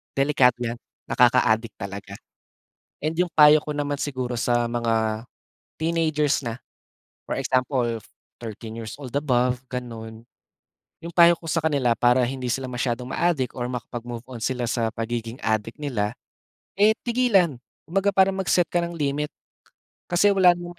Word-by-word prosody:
delikado 135 -3 +4
'yan, 120 0 -3 0.2
nakaka-adik 115 -2 +3
talaga. 100 0 -7 0.9
And 155 +2 -1
yung 180 0 +2
payo 150 0 +8
ko 150 - -5
naman 145 0 -2
siguro 130 -4 -3
sa 120 0 +1
mga 115 -1 0 0.5
teenagers 155 -3 +1
na, 115 0 -4 0.7
for - - -1
example 125 -3 0 0.4
thirteen 110 -1 -7
years 110 - -7
old 135 -4 -9
above 125 -3 +1
ganon. 115 -2 -7 0.8
'Yong 170 - -6
payo 170 -1 +7
ko 165 -1 -7
sa 165 - +1
kanila 145 -6 +1
para 125 +1 +4
hindi 130 +1 -2
sila 130 -1 -4
masyadong 125 0 -2
ma-adik 155 -7 0
or 120 - -1
makapag-move-on 120 0 -6
sila 125 +2 -2
sa 115 0 -1
pagiging 115 +1 -4
adik 110 +1 -1
nila, 110 -7 -1 0.7
eh, 215 +2 +5
tigilan. 215 - +2 0.2
Kumbaga 195 +4 0
parang 190 0 +3
mag-set 180 -1 +3
ka 175 - +2
ng 170 0 -3
limit 150 -1 -1 0.8
kasi 180 +4 +3
wala 190 -3 +5
namang 175 0 -9
130 Hz, 140 wpm, -24 LUFS, 120-160 Hz, 0.9 s, payo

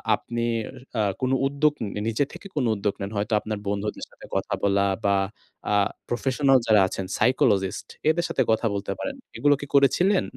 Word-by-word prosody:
আপনি 120 +2 -4 0.6
আ - - +4 0.2
কোনো 130 +1 +2
উদ্যোগ 145 +2 +2
উম 105 - -2 0.2
নিজে 115 +5 +1
থেকে 200 - -9
কোনো 130 -5 +1
উদ্যোগ 100 0 -1
নেন। 100 - -4
হয়তো 105 +2 -1
আপনার 110 -1 -4
বন্ধুদের 100 +1 -2
সাথে - - -14
কথা - - -1
বলা 100 0 +3 0.2
বা, 100 0 +4 0.6
আ - - +3 0.4
প্রফেশনাল 135 +2 +3
যারা 105 -3 +6
আছেন, 95 0 -4
সাইকোলজিস্ট, 100 -7 +2 0.2
এদের 170 +2 +2
সাথে 130 - +2
কথা 110 +1 +1
বলতে 100 0 -3
পারেন। 275 -1 -3 0.2
এগুলো 145 0 +4
কি 145 - -6
করেছিলেন? 180 +8 +4
120 Hz, 175 wpm, -25 LUFS, 100-140 Hz, 0.6 s, যারা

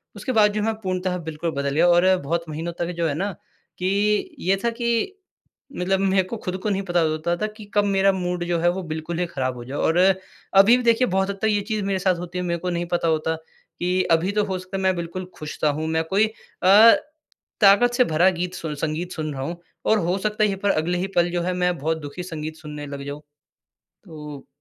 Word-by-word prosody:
उसके 260 - -4
बाद 210 -3 +4
जो 210 - -1
मैं 225 0 +1
पूर्णतः 185 -1 -1
बिल्कुल 160 +1 -3
बदल 140 -1 -2
गया। 170 +3 +4
और 180 +2 +5
बहुत 170 +4 -2
महीनों 165 +3 -4
तक 175 +1 -1
जो 165 - +2
है 145 - -1
ना 195 +5 -1 0.5
कि 185 - -1 0.5
ये 190 +2 +2
था 235 - +2
कि 235 - 0 0.7
मतलब 190 +2 +1
मेरे 190 -1 +3
को 230 +5 -6
खुद 185 -3 -4
को 215 - 0
नहीं 195 -1 0
पता 175 -2 +1
होता 155 +2 0
था 215 - -1
कि 215 - -10
कब 205 - +3
मेरा 195 0 +3
मूड 180 -2 -2
जो 175 -1 0
है, 175 - +3
वो 185 +2 -2
बिल्कुल 160 +1 -4
ही 180 - +1
खराब 130 -5 -2
हो 120 - -8
जाए। 135 +3 -5
और 165 - +1
अभी 195 +3 +3
भी 250 - -3
देखिए 235 +1 +3
बहुत 190 +1 0
हद 195 -1 -4
तक 220 - +2
ये 205 -1 +1
चीज़ 215 -2 -1
मेरे 195 -1 0
साथ 185 0 +2
होती 175 +1 -6
है, 180 - -1
मेरे 170 -1 -1
को 180 - -3
नहीं 175 0 -2
पता 170 -1 +1
होता 160 0 +1 0.4
कि 180 +1 +1
अभी 165 +4 +3
तो 210 0 +1
हो 190 -2 -2
सकता 185 +1 -6
है - - -3
मैं 190 -1 +3
बिल्कुल 170 +2 -5
खुश-सा 155 0 -2
हूँ, 155 +2 -2
मैं 160 0 +1
कोई 195 +6 +2 0.4
अ, 210 +5 +8 0.7
ताकत 210 +5 +6
से 250 +1 +4
भरा 165 +4 +4
गीत 180 +1 -3
सु 160 -4 -4
संगीत 160 +4 -3
सुन 155 -2 -3
रहा 135 - -5
हूँ, 170 +5 -4 0.3
और 220 - +4
हो 175 +1 0
सकता 215 +1 0
है - - +5
यही 195 - -1
पर 205 - +1
अगले 170 +2 0
ही 185 +2 -1
पल 175 0 +3
जो 175 - -1
है 180 +1 -1
मैं 180 -1 0
बहुत 160 +3 -1
दुखी 145 +5 -7
संगीत 155 -3 -6
सुनने 150 -2 -8
लग 140 0 -6
जाऊँ। 145 +1 -6 0.8
तो 150 -5 -9
180 Hz, 240 wpm, -23 LUFS, 160-195 Hz, 0.8 s, अ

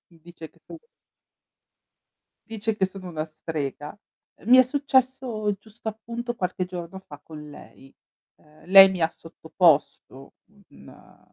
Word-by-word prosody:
dice 165 -1 -13
che - - -30
sono 330 - -11 1.7
dice 220 -1 -3
che 190 - +1
sono 190 -1 -10
una 155 -3 -4
strega. 155 0 -6 0.4
Ehm, - - -13
mi 255 - +9
è - - +9
successo 260 -5 0
giusto 220 +2 -10
appunto 235 +2 -6
qualche 185 -3 -3
giorno 180 0 -8
fa 145 -6 -14
con 150 -1 -11
lei. 135 -1 -16 0.4
Ehm, 150 0 -23
lei 195 +1 +9
mi 185 -2 -5
ha 160 - +3
sottoposto 160 -5 -1 0.4
un - - -18
185 Hz, 130 wpm, -24 LUFS, 160-225 Hz, 1.7 s, mi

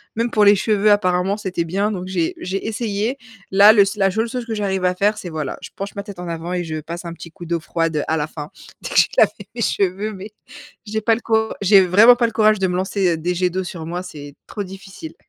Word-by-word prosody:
Même 230 +2 0
pour 210 -2 +3
les 205 0 +7
cheveux 210 +1 +2
apparemment, 190 -1 +2
c'était 185 -5 -3
bien, 195 +6 -1
donc 185 -3 -4
j'ai 175 -3 -1
j'ai 195 +3 -4
essayé. 220 +2 -2 0.3
Là, 200 +3 +7
le 210 - +6
s 200 +2 +1
la 195 -2 +2
seule 225 +4 -1
chose 250 0 -4
que 230 - -4
j'arrive 195 -3 -1
à 180 - +2
faire, 205 +3 +1
c'est 185 - -7
voilà, 155 -4 -4
je - - -8
penche 195 0 -6
ma 200 - -4
tête 200 -3 -10
en 180 - -6
avant 170 +1 -4
et 180 -1 -1
je 155 -2 -4
passe 170 +3 -7
un 170 - -5
petit 170 0 -11
coup 175 - -11
d'eau 170 0 -1
froide, 165 -1 -2
heu, - - 0
à 160 - +1
la 150 -1 -1
fin. 150 -1 -8 0.3
Dès - - -6
que - - -5
j'ai - - +6
lavé - - +5 0.2
mes 235 - -4
cheveux, 200 +3 -1
mais 195 +2 -9 0.6
j'ai 220 +1 -3
pas 225 +1 +3
le 235 - -7
cour 220 -1 0
j'ai 200 0 +6
vraiment 210 +7 +7
pas 240 -1 +1
le - - -5
courage 215 -1 +3
de 190 - +1
me 180 - -2
lancer 185 -2 0
des 175 +3 -2
jets 180 0 +1
d'eau 185 +2 -3
sur 175 -2 -7
moi, 175 +2 -4
c'est 145 -5 -10
trop 210 - -6
difficile. 195 - -10
190 Hz, 265 wpm, -20 LUFS, 175-210 Hz, 0.6 s, les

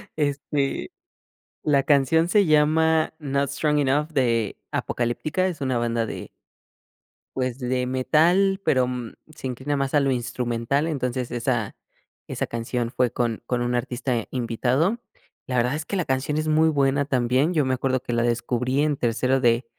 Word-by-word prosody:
Este, 145 - -1 0.7
la 140 -2 +3
canción 145 +4 +3
se 200 +1 +4
llama 155 +1 +3
"Not 140 -2 -1
Strong 150 +1 0
Enough" 145 +2 +1
de 115 -7 +1 0.2
Apocalyptica, 145 +9 -1
es 175 -5 -4
una 130 -2 0
banda 115 -1 0
de - - -7 1.1
pues, 130 -1 -2
de 125 0 -1
metal, 170 +10 +3
pero, 130 -1 +3
mm, 125 -2 -5 0.2
se - - -7
inclina 130 +3 -2
más 135 0 -2
a 145 - +5
lo 140 -1 +1
instrumental. 125 +3 -1
Entonces 130 -5 -2
esa 120 -3 -1 0.5
esa - - -3
canción 115 +1 -3
fue 125 -2 +2
con 120 -2 -1
con 125 0 -1
un 120 0 -1
artista 120 -1 -2
invitado. 130 - 0 0.5
La 125 - -2
verdad 125 +3 +2
es 155 - -3
que 200 - -4
la 180 - 0
canción 135 +3 -1
es 155 - -1
muy 155 +1 +4
buena 140 -1 +2
también, 130 +4 +1
yo 150 - +2
me 130 0 +1
acuerdo 130 0 0
que 120 - -6
la 120 - +1
descubrí 120 +3 0
en 150 -1 +1
tercero 130 +2 +1
de 120 0 +3
130 Hz, 165 wpm, -24 LUFS, 120-150 Hz, 1.1 s, a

